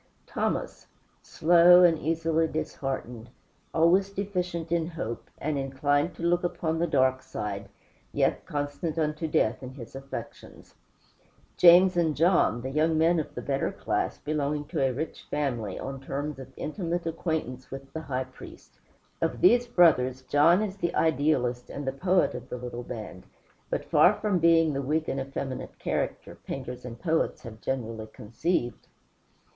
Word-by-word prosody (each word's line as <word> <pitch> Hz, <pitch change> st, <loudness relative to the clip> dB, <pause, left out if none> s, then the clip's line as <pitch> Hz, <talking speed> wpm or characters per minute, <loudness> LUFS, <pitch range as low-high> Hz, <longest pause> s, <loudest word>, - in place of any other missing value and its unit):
Thomas, -, -, -3 dB, 0.3 s
slow 175 Hz, +2 st, +6 dB
and 170 Hz, -2 st, +6 dB
easily 165 Hz, 0 st, +1 dB
disheartened; 135 Hz, -6 st, -4 dB, 0.4 s
always 175 Hz, +4 st, +3 dB
deficient 180 Hz, -4 st, -3 dB
in 170 Hz, -1 st, +1 dB
hope, 120 Hz, -9 st, -6 dB
and 145 Hz, -1 st, -2 dB
inclined 145 Hz, +4 st, 0 dB
to -, -, -8 dB
look 175 Hz, +1 st, +2 dB
upon 165 Hz, -2 st, -1 dB
the 170 Hz, -, +1 dB
dark 130 Hz, -3 st, +2 dB
side, 130 Hz, -5 st, -5 dB, 0.4 s
yet -, -, +1 dB
constant 145 Hz, +3 st, -3 dB
unto 155 Hz, 0 st, -1 dB
death 110 Hz, -7 st, +1 dB
in 130 Hz, 0 st, -8 dB
his 125 Hz, -1 st, -10 dB
affections. 135 Hz, 0 st, -9 dB, 0.8 s
James 180 Hz, +1 st, +7 dB
and 165 Hz, -3 st, +1 dB
John, 160 Hz, -, +3 dB
young 160 Hz, +2 st, +2 dB
men 165 Hz, +2 st, +3 dB
of 155 Hz, -, -5 dB
the -, -, -5 dB
better 135 Hz, -1 st, -1 dB
class, -, -, -2 dB
belonging 150 Hz, 0 st, -2 dB
to 160 Hz, -4 st, -2 dB
a 135 Hz, -1 st, +2 dB
rich 150 Hz, +6 st, -5 dB
family, 120 Hz, -9 st, -2 dB
on 135 Hz, 0 st, -5 dB
terms 140 Hz, +1 st, -4 dB
of 130 Hz, 0 st, -10 dB
intimate 170 Hz, +1 st, -3 dB
acquaintance 160 Hz, -6 st, -3 dB
with 135 Hz, 0 st, -9 dB
the 160 Hz, -, -4 dB
High 130 Hz, -3 st, -2 dB
Priest. 130 Hz, 0 st, -14 dB, 0.4 s
Of -, -, -1 dB
these 245 Hz, -9 st, +5 dB
brothers, 130 Hz, -, +3 dB
John 165 Hz, +9 st, +4 dB
is 200 Hz, -2 st, -4 dB
the 170 Hz, -3 st, -2 dB
idealist 135 Hz, -5 st, +1 dB
and 145 Hz, -, -6 dB
the 135 Hz, -, 0 dB
poet 180 Hz, +6 st, +2 dB
of -, -, -8 dB
the -, -, -4 dB
little 120 Hz, 0 st, -6 dB
band, 110 Hz, -6 st, -8 dB, 0.4 s
but -, -, -2 dB
far -, -, +5 dB
from 205 Hz, -4 st, 0 dB
being 165 Hz, -2 st, +4 dB
the 140 Hz, -, -1 dB
weak 155 Hz, +4 st, -1 dB
and 135 Hz, -, -2 dB
effeminate 135 Hz, -1 st, -5 dB
character -, -, -3 dB
painters 125 Hz, -2 st, -6 dB
and 120 Hz, -1 st, -8 dB
poets 160 Hz, -2 st, 0 dB
have 110 Hz, -2 st, -10 dB
generally 115 Hz, -4 st, -3 dB
conceived. 120 Hz, +5 st, -3 dB
150 Hz, 155 wpm, -27 LUFS, 130-170 Hz, 0.8 s, James